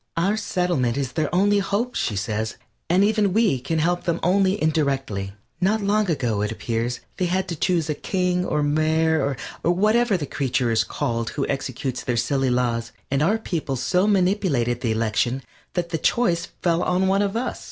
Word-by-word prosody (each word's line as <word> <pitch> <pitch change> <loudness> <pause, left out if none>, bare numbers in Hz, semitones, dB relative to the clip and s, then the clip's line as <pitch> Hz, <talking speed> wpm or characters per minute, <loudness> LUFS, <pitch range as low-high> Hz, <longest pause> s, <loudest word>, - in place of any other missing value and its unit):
Our 190 +5 +2
settlement 180 - 0
is 135 -3 -2
their 155 -2 -1
only 205 +2 +4
hope, 210 +5 -1
she 105 - -1
says, 110 +2 -2 0.3
and 180 +3 +4
even 210 -2 +2
we 210 - +3
can 160 +6 -2
help 175 +3 0
them 170 - 0
only 190 +2 +3
indirectly. 135 -11 -1 0.3
Not 210 +4 +2
long 205 0 +2
ago, 120 -10 0
it 105 - -1
appears, 115 +2 -2 0.2
they 180 - 0
had 185 +2 0
to 170 - -2
choose 165 0 +1
a 155 - 0
King 180 +2 0
or 150 -4 0
Mayor, 155 -1 +1 0.3
or 170 - +3
whatever 215 +3 +3
the 150 - -3
creature 130 -4 0
is 110 -1 +3
called 115 0 -2
who 140 - -2
executes 130 -1 -3
their 125 -2 -1
silly 135 +3 +1
laws, 120 -2 0 0.2
and 140 +1 +1
our 195 +8 +3
people 165 -10 -3
so 180 - +1
manipulated 180 - +1
the 115 - 0
election 115 +4 0 0.3
that 175 -1 -2
the 165 -1 -2
choice 175 -7 +1 0.2
fell 170 -1 +2
on 180 +1 +1
one 195 +1 +3
of 200 +2 0
us. 250 - -3
160 Hz, 185 wpm, -23 LUFS, 125-190 Hz, 0.3 s, only